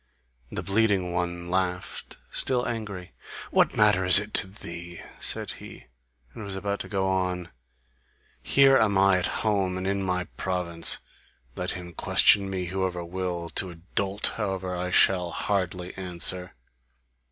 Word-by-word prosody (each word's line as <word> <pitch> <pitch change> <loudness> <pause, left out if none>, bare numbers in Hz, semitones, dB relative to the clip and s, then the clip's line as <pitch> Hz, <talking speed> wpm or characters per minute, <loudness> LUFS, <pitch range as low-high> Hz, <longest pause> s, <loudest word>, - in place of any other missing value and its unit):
The - - -5
bleeding 100 -3 0
one 85 0 -4
laughed, 90 -1 -3
still 125 -2 +2
angry, 105 -6 -6 0.4
"What - - +2
matter 105 -3 +3
is 90 0 +12
it 105 +1 +1
to - - +7
thee!" 85 -4 -9 0.2
said - - -3
he, - - -12 0.5
and 110 - -9
was 100 -1 -2
about 100 +1 -3
to - - -2
go 95 -2 -1
on. 90 -2 -2 0.9
"Here 135 -1 +4
am 100 -3 +1
I 95 -1 +4
at 90 - -2 0.2
home 95 -4 0
and 95 - -5
in 100 0 -1
my 90 -1 -2
province. 85 -3 0 0.6
Let 90 - -4
him 90 -1 -10
question 100 +4 +3
me 95 -2 -4
whoever 90 -1 -3
will: 90 -1 -5
to 95 - -2
a 85 - -11
dolt, 95 +4 -2
however, 95 -4 -3
I 90 +1 -4
shall 90 -1 +2
hardly 90 0 -3
answer." 90 0 -2
95 Hz, 150 wpm, -25 LUFS, 90-100 Hz, 0.9 s, is